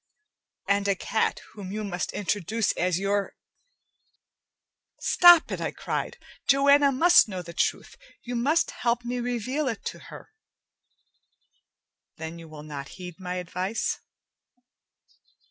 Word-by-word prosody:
And 200 0 +1
a 200 - +2
cat 220 +4 -1
whom 195 -3 -8
you 215 +1 -4
must 185 -3 -3
introduce 205 +2 -1
as 180 -1 0
your 200 +1 -1 0.8
" - - -54
"Stop 350 -2 +7
it!" - - -3
I - - -1
cried. - - -4 0.3
"Joanna 280 +1 +5
must 345 +4 +6
know 185 -2 -5
the 170 0 -10
truth. - - -2 0.3
You 245 0 -5
must 285 +8 +1
help 240 0 -1
me 245 +1 -2
reveal 245 +4 -2
it 230 -5 -4
to - - -5
her." - - -12 1.9
"Then 160 +1 -7
you 165 - -11
will 150 -1 -10
not 145 -2 -7
heed 180 -1 -9
my 180 -1 -4
advice?" 185 +4 -2
205 Hz, 130 wpm, -26 LUFS, 180-250 Hz, 1.9 s, Stop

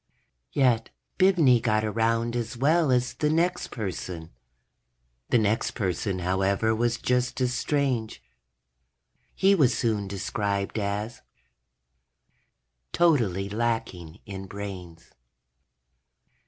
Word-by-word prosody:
_ - - -55 0.5
Yet 120 -4 +2 0.3
Bibney 165 -11 +5
got 110 -2 +1
around 115 +2 0
as 120 0 -3
well 155 +4 +3
as 125 -1 +1
the 150 - 0
next 175 +3 +1
person. 90 -6 -6 1.0
The - - +4
next 110 0 0
person, 95 -2 -1
however, 95 +4 +1
was 120 +1 0
just 125 +1 0
as 125 -1 +1
strange. 130 -4 -1 1.2
He 195 +1 +4
was 130 -11 +3
soon 105 -4 0
described 100 +2 -2
as: 105 +3 -3
_... - - -24 1.7
totally 115 - +2
lacking 105 -7 -3
in 95 -1 -7
brains. 90 -5 -8
115 Hz, 105 wpm, -26 LUFS, 100-125 Hz, 1.7 s, Bibney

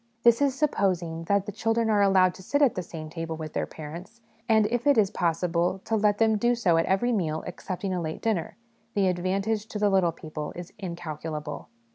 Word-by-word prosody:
This 235 +2 +5
is 275 -2 +2
supposing 180 - 0
that 200 +1 +2
the 205 - -4
children 225 +2 0
are 210 -2 +3
allowed 190 -2 +4
to - - -12
sit 285 +10 +1
at 260 - +4
the 185 - -3
same 160 -2 -8
table 165 0 -5
with 155 -1 -6
their - - -1
parents; 170 +9 -9 0.3
and, 220 -1 +5
if 240 +2 0
it 285 - +5
is 205 -2 +4
possible 175 +1 0
to 225 - 0
let 210 -1 +2
them 220 -1 +3
do 240 +2 +3
so 185 -8 +2
at 165 - +1
every 195 +6 +2
meal 160 -8 -1
excepting 190 0 -4
a 180 - -1
late 160 -1 -4
dinner, 210 -8 -1 0.4
the 200 -2 +3
advantage 195 +4 -1
to 220 - -5
the 205 -1 +2
little 185 -3 +3
people 155 -2 -7
is 175 0 -8
incalculable. 160 -4 -6
190 Hz, 210 wpm, -27 LUFS, 165-220 Hz, 0.4 s, This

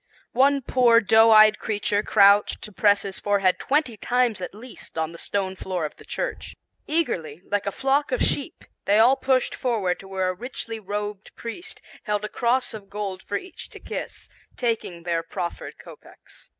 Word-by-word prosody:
One 275 +2 +3
poor 240 -2 +5
doe 225 +1 +5
eyed 215 -1 +7
creature 205 -1 0
crouched 200 0 +4
to 210 - -8
press 205 0 +3
his 195 -1 -6
forehead 200 -3 +2
twenty 275 -5 0
times 240 -2 +1
at 180 - -6
least 235 -5 -10
on 160 0 -1
the 170 - -9
stone 190 -2 -2
floor 185 -3 -3
of 150 - -6
the - - -15
church. - - -4 0.3
Eagerly, 180 - -2
like 205 -1 0
a - - 0
flock 275 +6 0
of - - 0
sheep, - - -1 0.2
they 205 - +4
all 240 +5 +6
pushed 260 -2 +1
forward 210 -8 -1
to 195 - -12
where 190 -1 -1
a - - -1
richly 230 0 -6
robed 205 0 -5
priest 235 +10 -7 0.2
held 210 -1 -1
a - - -5
cross 250 +1 +1
of 205 -3 -9
gold 200 -2 -5
for 205 - -3
each 370 -2 -9
to - - -11
kiss, - - -6 0.3
taking 225 -8 -2
their 170 -1 0
proffered 170 +1 -6
kopeks. - - -14
210 Hz, 180 wpm, -24 LUFS, 190-245 Hz, 0.3 s, eyed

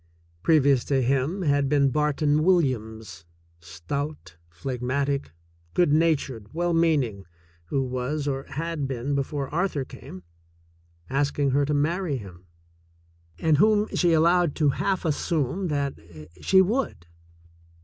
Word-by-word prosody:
Previous 140 - +4
to 135 -2 +1
him 140 +9 0
had 145 -3 +2
been 140 -2 +3
Barton 150 +1 +1
Williams, 110 - 0 0.4
stout, 115 - -6
phlegmatic, 130 - -2 0.4
good 175 -5 +3
natured, 140 -9 0
well 175 0 0
meaning, 140 - +1 0.4
who 135 +11 -1
was, 130 +4 -3
or 135 -1 -2
had 160 -1 -3
been 135 +1 -3
before 140 0 -2
Arthur 165 -5 -1
came, 110 -8 -11 0.8
asking 140 0 0
her 140 +2 +2
to 150 +1 0
marry 160 +1 0
him, 90 -5 -12 0.9
and 155 - +2
whom 210 +3 +3
she 175 -2 +2
allowed 170 0 +3
to 150 -3 +2
half 190 +6 -1
assume 160 +3 -1
that 140 - -2 0.4
she 190 0 +5
would. 215 - -2
145 Hz, 120 wpm, -25 LUFS, 130-165 Hz, 0.9 s, she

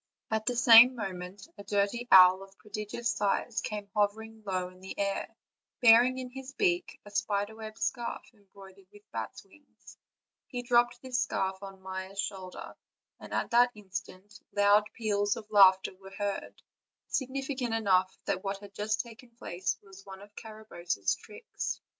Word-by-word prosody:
At 220 -1 -1
the 245 - +1
same 240 +1 +8
mo 200 -5 -4
ment 180 - -9
a - - -8
dirty 205 +4 -1
owl, 185 0 +8
of 195 - -11
a 195 - -25
prodigious 215 +3 -4
size, 210 +3 -1
came 210 -1 -5
hovering 220 +2 -1
low 185 -1 -1
in 185 0 -18
the 190 +1 -9
air, 200 0 -1 0.5
bearing 245 +1 +6
in 255 -1 -6
his 265 +1 -9
beak 360 0 0
a 205 - -12
spider 205 +1 -1
web 220 -1 -9
scarf, 240 -2 -3
embroidered 195 -2 -17
with 205 0 -17
bats' 110 -1 -6
wings; 280 +9 -19 0.5
he 245 -2 -5
dropped 240 0 +2
this 255 -1 -1
scarf 190 0 -2
on 195 -1 -10
Maia's 190 +1 -6
shoulder, 190 -2 -5 0.5
and - - -11
at - - -2
that 240 +1 +5
instant 195 0 -8
loud 205 +1 +4
peals 205 -3 0
of 215 -1 -10
laugh 190 -2 +8
ter - - -5
were 195 0 -13
heard, 200 0 -5 0.4
significant 265 -2 -2
enough 190 -4 +2
that 185 - -2
what 195 0 -2
had 200 0 -13
just 210 +1 -1
taken 235 +1 -14
place 190 -6 -4
was 195 -1 -15
one 195 0 -11
of 205 0 -18
Carabosse's 175 - -3
tricks. - - -6
205 Hz, 165 wpm, -30 LUFS, 195-235 Hz, 0.5 s, same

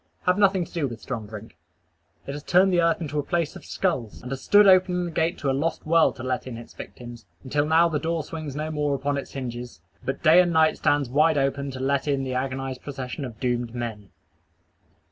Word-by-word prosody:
Have 180 +2 +2
nothing 195 -3 +3
to - - -18
do 165 -5 0
with 120 -2 -8
strong 115 -5 -5
drink. 105 -3 -10 0.7
It - - -5
has 145 +1 -6
turned 185 +4 +3
the 175 - +4
earth 165 0 +2
into 150 -2 -2
a - - -1
place 170 -1 -1
of - - -10
skulls, 135 - -2
and 125 - -7
has 135 0 -4
stood 205 0 +6
opening 185 -2 +4
the 170 - -5
gate 165 +2 0
to 140 - -2
a - - 0
lost 155 +5 -2
world 165 -1 +4
to 130 - -8
let 130 0 -2
in 120 -3 -6
its 120 - -11
victims, 120 -1 -10 0.2
until 145 +2 0
now 165 +2 +5
the 155 -3 -1
door 165 0 -1
swings 155 -2 -6
no 155 +1 -3
more 150 -2 0
upon 140 +1 -1
its 140 - -5
hinges, 125 -2 -6 0.2
but - - -4
day 165 +4 +7
and 175 -1 +1
night 160 -1 +3
stands 145 -2 +2
wide 150 +5 +3
open 140 0 0
to 130 -1 -7
let 140 +2 0
in 140 -2 +1
the 130 -1 -3
agonized 130 0 -3
procession 135 0 -6
of 115 -3 -9
doomed 120 -2 -1
men. 110 -4 -5
140 Hz, 230 wpm, -25 LUFS, 130-165 Hz, 0.7 s, day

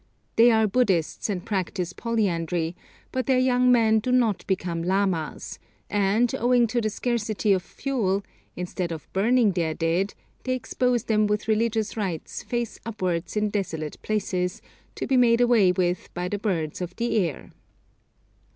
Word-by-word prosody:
They 230 +2 +7
are 220 -1 +4
Buddhists, 200 -6 +1
and 185 -4 -3
practise 185 -3 -2
polyandry, 175 -7 -1 0.4
but 255 0 -2
their 260 -2 +4
young 250 0 +3
men 220 -2 +4
do 250 +4 -2
not 235 -5 +2
become 175 -3 -1
lamas, 185 -3 -1 0.3
and 205 +4 +2
owing 245 0 +4
to 240 +1 0
the 215 - 0
scarcity 215 -2 0
of 185 - +1
fuel, 200 -4 -1 0.3
instead 180 0 -3
of 160 -2 -6
burning 220 +2 +3
their 165 -3 -1
dead, 170 +5 0 0.3
they 255 0 -1
expose 250 -1 0
them 215 -2 +2
with 210 +1 -1
religious 220 0 0
rites 190 -7 -4
face 240 -2 -3
upwards 185 -5 -3
in 210 0 +1
desolate 160 -7 -3
places, 190 -2 -1 0.4
to - - -3
be 265 - +2
made 235 -2 +5
away 235 -6 +5
with 180 0 -1
by 180 +1 -2
the 205 +2 -3
birds 175 -7 -2
of 180 0 -5
the 235 -1 0
air. 170 -9 -2
210 Hz, 155 wpm, -25 LUFS, 180-235 Hz, 0.4 s, They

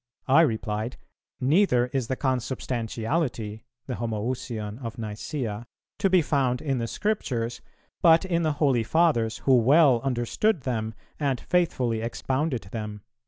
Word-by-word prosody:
I 140 +5 +6
replied, 110 -4 -1 0.4
'Neither 135 -2 +3
is 130 -4 0
the 130 - -1
Consubstantiality,'" 120 -2 -2 0.2
(the 130 - -4
Homoüsion 115 0 -4
of 115 -1 -5
Nicæa,) 110 +1 -4 0.3
"'to 195 - +3
be 185 -3 +4
found 130 -4 +1
in 135 -4 -1
the 115 - -2
Scriptures, 120 - -2 0.4
but 165 +1 +6
in 170 -2 0
the 155 -2 +1
Holy 140 -5 +2
Fathers 115 -5 +2
who 135 - +6
well 130 +1 +5
understood 135 - 0
them 110 -4 -3 0.2
and 140 -4 0
faithfully 130 -10 0
expounded 125 0 -2
them.'" 105 -2 -5
125 Hz, 130 wpm, -26 LUFS, 115-145 Hz, 0.4 s, I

